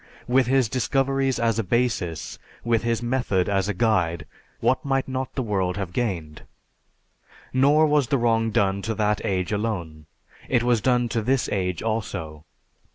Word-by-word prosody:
With 125 0 +3
his 130 -2 +3
discoveries 135 +3 0
as 115 -1 +1
a - - +1
basis, 105 -6 -1 0.2
with 115 -1 +1
his 115 0 -1
method 120 -7 0
as 100 0 0
a - - 0
guide, 90 -8 +1 0.3
what 130 +4 +1
might 135 -2 0
not 130 0 -4
the 130 - -1
world 95 -4 -1
have 95 -3 -4
gained! 85 -11 -3 1.1
Nor 145 +4 +4
was 150 -4 +2
the 140 - +1
wrong 115 -2 +2
done 100 -2 +1
to 110 +2 -3
that 105 -1 0
age 95 -1 -1
alone; 85 -8 -3 0.4
it 125 -2 +2
was 120 -2 +2
done 125 0 +2
to 115 0 -1
this 130 +3 +1
age 90 -3 -2
also.... 90 -9 -4
115 Hz, 160 wpm, -24 LUFS, 95-130 Hz, 1.1 s, Nor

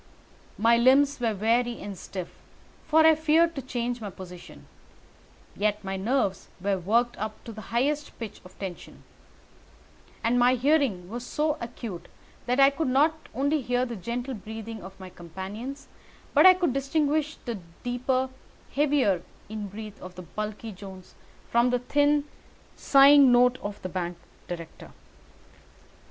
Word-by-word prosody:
My 230 +2 +4
limbs 270 +4 +4
were 230 -3 0
weary 235 +4 +1
and 200 -1 -6
stiff, 185 -1 -7 0.6
for 315 +1 +5
I 320 - +8
feared 320 +2 +3
to 275 - -5
change 245 -2 -3
my 210 - -4
position; 180 -1 -11 0.9
yet 210 0 0
my 195 0 -3
nerves 195 -1 0
were 195 +1 0
worked 235 +7 +1
up 215 +1 -5
to 230 - -8
the 215 0 -9
highest 285 +5 -1
pitch 220 -3 -7
of 180 - -16
tension, 190 -3 -8 1.2
and 240 +2 +2
my 250 +1 +5
hearing 255 - +1
was 235 +5 -6
so 300 +4 0
acute 230 -6 -7 0.4
that 250 +2 +1
I 275 0 +7
could 300 +2 -2
not 305 +5 +2
only 285 +4 +1
hear 245 0 0
the 240 -2 -5
gentle 240 +6 -4
breathing 220 0 -7
of 190 +1 -11
my 185 -1 -9
companions, 195 - -7 0.5
but - - +8
I 370 - +9
could 350 -8 0
distinguish 295 +2 0
the 235 -5 -4 0.2
deeper, 255 +1 0 0.4
heavier 275 - +2 0.3
in 215 -1 -5
breath 210 +1 -9
of 180 0 -10
the 180 - -8
bulky 215 +5 -5
Jones 190 -1 -11 0.4
from 235 +1 +4
the 250 - +2
thin, 290 +3 +2 0.5
sighing 275 -1 +7
note 250 +1 +4
of 205 0 -5
the 185 - -3
bank 175 -1 -3 0.3
director. 170 -2 -8
240 Hz, 150 wpm, -27 LUFS, 200-275 Hz, 1.2 s, I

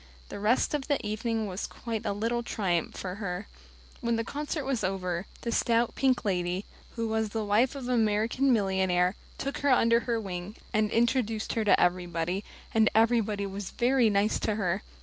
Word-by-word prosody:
The - - -6
rest 220 +8 +2
of 290 -3 -2
the 285 -2 +2
evening 220 +1 -1
was 190 -1 -4
quite 225 -2 -5
a - - +1
little 230 +4 -1
triumph 185 -8 -1
for 180 -1 -4
her. 190 +1 -3 0.5
When 235 -3 0
the 230 - 0
concert 295 +3 -3
was 265 -5 -1
over, 185 -1 -2
the 235 - -2
stout, 235 0 +2
pink 260 -3 +1
lady 180 0 -1 0.3
who 230 -1 -1
was 220 -1 0
the 220 0 -2
wife 225 +7 +2
of 265 -3 -5
an 250 - +1
American 225 +4 +2
millionaire 190 -4 +2 0.2
took 275 +1 -3
her 285 - +1
under 230 -2 +5
her 235 0 -1
wing, 190 0 -5 0.2
and 215 0 +2
introduced 230 -1 +1
her 225 - 0
to 205 - +5
everybody; 175 +1 0 0.3
and 220 -1 +5
everybody 220 -3 +3
was 195 0 -5
very 245 -1 +3
nice 205 +1 +2
to 215 - 0
her. 190 -1 0
220 Hz, 185 wpm, -29 LUFS, 195-235 Hz, 0.5 s, under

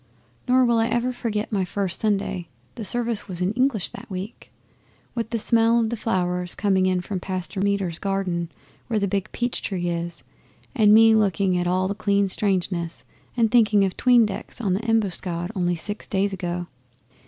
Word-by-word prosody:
Nor 255 0 +4
will 235 -1 +3
I 225 - +2
ever 240 +2 0
forget 225 -4 -3
my 200 -3 +1
first 185 0 -2
Sunday 195 -5 -1 0.3
the 225 - -7
service 235 0 0
was 180 -3 -6
in 180 +1 +1
English 250 -5 0
that - - -11
week 190 +3 -7 0.6
with 230 -2 -3
the 230 - -1
smell 230 +1 +3
of 225 -1 0
the - - -1
flowers 180 -5 -1
coming 190 -2 +2
in 185 -1 +1
from 190 +1 -4
Pastor 185 +1 -4
Meder's 195 -4 0
garden 190 -4 -2 0.4
where 225 - 0
the 200 -1 +1
big 195 0 -2
peach 240 0 -2
tree 175 -3 -2
is, 170 0 -4 0.5
and 215 -6 +4
me 225 +1 +7
looking 195 -3 +2
at 175 0 0
all 185 +1 +1
the 200 - -1
clean 200 -1 +1
strangeness 185 -4 -1 0.3
and 225 -2 +3
thinking 210 -4 +4
of 185 - -3
'tween 245 -2 +5
decks 210 +3 -6
on 200 -6 0
the 200 +4 -2
Embuscade 185 -5 0
only 175 -2 0
six 205 +6 -4
days 200 0 0
ago. 175 -1 -3
200 Hz, 185 wpm, -24 LUFS, 180-225 Hz, 0.6 s, me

